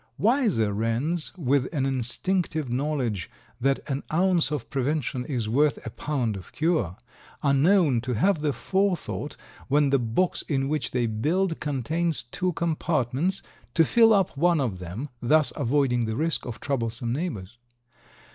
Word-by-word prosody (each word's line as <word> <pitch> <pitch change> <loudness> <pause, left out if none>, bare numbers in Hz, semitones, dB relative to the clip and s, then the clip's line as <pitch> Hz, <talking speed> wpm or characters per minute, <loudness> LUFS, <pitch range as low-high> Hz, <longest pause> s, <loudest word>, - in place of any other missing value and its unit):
Wiser 210 - +2
wrens, 120 +10 +1
with 140 -4 +1
an 140 -5 0
instinctive 135 +3 -1
knowledge 130 - -1 0.3
that 135 +2 0
an 135 0 -2
ounce 175 0 +3
of 150 -6 -3
prevention 135 -1 -1
is 125 -7 -2
worth 140 +4 +2
a 115 - -5
pound 125 -7 -2
of 95 - -10
cure, 155 - 0 0.5
are 140 - +3
known 150 - +4
to 125 0 -2
have 180 - +2
the 150 -1 +1
forethought 180 0 -1 0.3
when 145 0 +3
the 140 - +4
box 120 +10 0
in 135 -3 +1
which 150 +1 -1
they 125 -1 0
build 165 - 0
contains 155 +4 -1
two 180 +10 -2
compartments, 160 +1 0 0.3
to 165 - +5
fill 225 +6 +5
up 195 -7 +2
one 170 +3 +3
of 115 -9 -1
them, 90 +10 -5
thus 150 +5 +3
avoiding 130 -3 +1
the 110 - -2
risk 160 +1 -1
of 115 -4 -6
troublesome 120 -3 -2
neighbors. 120 - -4
140 Hz, 150 wpm, -26 LUFS, 120-165 Hz, 0.5 s, to